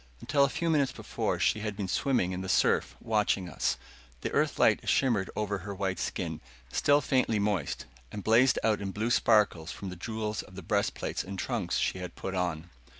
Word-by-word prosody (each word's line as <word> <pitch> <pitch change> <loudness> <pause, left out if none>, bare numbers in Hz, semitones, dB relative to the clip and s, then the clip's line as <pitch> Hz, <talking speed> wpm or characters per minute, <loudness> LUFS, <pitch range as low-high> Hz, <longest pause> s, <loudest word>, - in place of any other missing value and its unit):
Until 140 - +2
a 140 - +3
few 170 - -2
minutes 140 -4 +2
before - - -2
she 110 - +2
had 105 -1 -3
been 100 -3 -2
swimming 110 -3 +1
in 90 0 -3
the 95 - -5
surf, - - +2
watching 105 -4 +1
us. 85 - -1 0.4
The - - -2
Earth - - +1
light - - +3
shimmered 115 -8 +2
over 105 -2 -1
her 100 +2 -6
white 95 -2 -2
skin, - - -3 0.3
still 145 - +3
faintly 130 -6 +1
moist, 100 -7 -1 0.3
and 105 - -6
blazed 120 +3 +5
out 110 -2 +2
in 100 - -3
blue 110 +5 -2
sparkles 105 -9 +3
from 100 - -6
the - - -7
jewels 110 +3 -3
of 95 - -15
the 95 - -8
breastplates - - -1
and 95 +1 -7
trunks 100 -4 -1
she 95 - 0
had 90 -2 -7
put 95 - -5
on. 90 -2 -2
100 Hz, 200 wpm, -29 LUFS, 95-115 Hz, 0.4 s, blazed